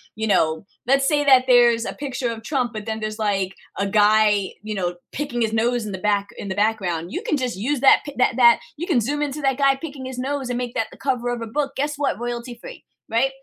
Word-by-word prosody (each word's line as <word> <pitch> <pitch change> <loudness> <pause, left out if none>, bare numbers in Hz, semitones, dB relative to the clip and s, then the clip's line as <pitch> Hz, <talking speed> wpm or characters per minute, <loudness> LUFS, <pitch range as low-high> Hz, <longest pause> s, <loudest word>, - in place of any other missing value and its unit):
you 220 - -2
know 160 -4 +1 0.2
let's 275 +1 +3
say 295 -2 +2
that 260 -3 +6
there's 240 -2 +5
a - - -4
picture 255 -4 -3
of 225 -1 -7
Trump, 245 -2 -1
but 215 0 -7
then 220 0 -3
there's, 215 +1 -4
like, 195 -3 0 0.2
a 200 - 0
guy, 210 -1 +3
you 215 0 -4
know, 180 -3 -2 0.2
picking 270 -4 -3
his 225 -1 0
nose 235 +1 +1
in 210 - -5
the 190 - -5
back 205 -1 0
in - - -6
the 190 - -3
background. 190 -5 -1
You - - -3
can 300 - 0
just 250 -5 -2
use 255 +7 -2
that 270 - +7
pic 290 -3 -9
that 255 - +2
that 235 -1 +6 0.2
you 345 +4 -4
can 295 -9 +3
zoom 290 +6 -2
into 295 0 -3
that 270 0 +1
guy 275 -1 +4
picking 275 -2 -8
his 260 -1 -7
nose 270 0 -3
and 245 - -1
make 245 -1 -4
that 225 - -1
the - - -14
cover 250 -3 -1
of 240 -1 -3
a - - -6
book. 275 +4 -2
Guess 295 +2 -1
what? 280 -6 0
Royalty 240 0 -5
free, - - -10 0.2
right? 235 +4 +2
240 Hz, 255 wpm, -22 LUFS, 215-270 Hz, 0.2 s, that